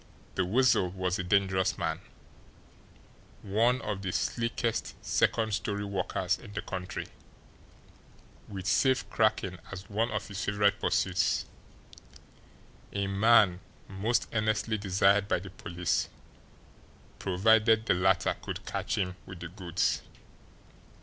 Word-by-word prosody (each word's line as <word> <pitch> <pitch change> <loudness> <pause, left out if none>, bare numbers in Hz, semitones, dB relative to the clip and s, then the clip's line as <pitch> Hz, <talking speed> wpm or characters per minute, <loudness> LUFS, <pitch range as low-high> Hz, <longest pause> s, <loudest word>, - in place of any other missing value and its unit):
The - - +1
Weasel 115 -2 +3
was 90 0 -2
a - - -1
dangerous 95 0 +2
man, - - -2 1.4
one 115 +6 +2
of 100 -2 -3
the 95 -2 -2
slickest 115 +2 -1
second 110 -2 +1
story 105 -1 -2
workers 95 -1 -1
in 105 -4 -12
the 100 - -3
country, 95 -1 -5 1.4
with 95 -2 -7
safe 130 +5 +2
cracking 110 -5 +1
as 95 -1 -8
one 110 +3 +1
of 105 -1 -3
his 100 -1 -5
favourite 100 0 +2
pursuits, 95 0 +1 1.5
a 100 -1 -1
man 100 -2 +4 0.3
most 105 +5 0
earnestly 110 0 0
desired 100 +1 +3
by - - +2
the 95 +2 -8
police, 90 -2 -2 1.1
provided 110 +4 +3
the - - +3
latter 95 +1 +2
could - - -6
catch - - -2
him 90 -2 -1
"with 95 -3 -9
the 85 - -6
goods." 90 -2 -1
100 Hz, 120 wpm, -29 LUFS, 95-110 Hz, 1.5 s, man